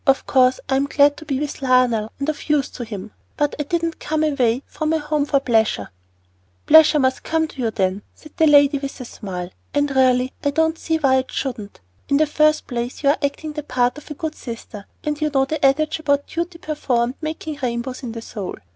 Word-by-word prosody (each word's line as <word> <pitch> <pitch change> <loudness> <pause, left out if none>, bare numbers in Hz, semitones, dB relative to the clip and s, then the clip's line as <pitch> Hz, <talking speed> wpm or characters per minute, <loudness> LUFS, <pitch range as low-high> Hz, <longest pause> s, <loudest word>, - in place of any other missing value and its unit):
Of 270 0 +3
course 255 -1 +3
I'm 270 +1 +1
glad 285 0 +4
to 315 - -10
be 270 -3 -1
with 295 0 -4
Lionel 250 -4 +2
and 280 - -3
of 310 0 -4
use 295 -3 +2
to 245 - -6
him, 210 -2 -7 0.3
but 295 -1 +1
I - - +1
didn't 335 +2 -2
come 310 0 -1
away 260 -4 +1
from 310 0 -2
home 300 -2 0
for 285 -1 +2
pleasure." 220 - +1 0.7
"Pleasure 315 0 +7
must 260 -2 +1
come 320 0 0
to 270 - -8
you, 230 - +1
then," 195 -2 -1
said 310 - -15
the 320 -2 +4
lady, 285 -1 +5
with 275 0 -6
a 250 - -6
smile. 185 -5 -6 0.2
"And 290 -1 +1
really 255 -1 +3
I 285 - +2
don't 320 +2 +1
see 320 -1 0
why 270 -4 +3
it 260 0 -2
shouldn't. 225 -7 -5 0.3
In 280 - +4
the 310 - +4
first 305 +1 +2
place 245 +2 -4
you 280 - +4
are 285 - +3
acting 300 +2 -2
the 300 - -4
part 250 -1 0
of - - -16
a 300 - -6
good 315 +1 -4
sister; 230 -6 -9 0.2
and 300 0 -3
you 305 - +2
know 270 -1 +2
the 310 +2 -4
adage 300 +4 +2
about 285 -2 +1
duty 340 +1 -4
performed 255 -7 -1
making 310 -1 -5
rainbows 250 +1 -3
in 240 -4 -6
the 230 -1 -7
soul. 200 -5 -6
280 Hz, 220 wpm, -21 LUFS, 250-305 Hz, 0.7 s, Pleasure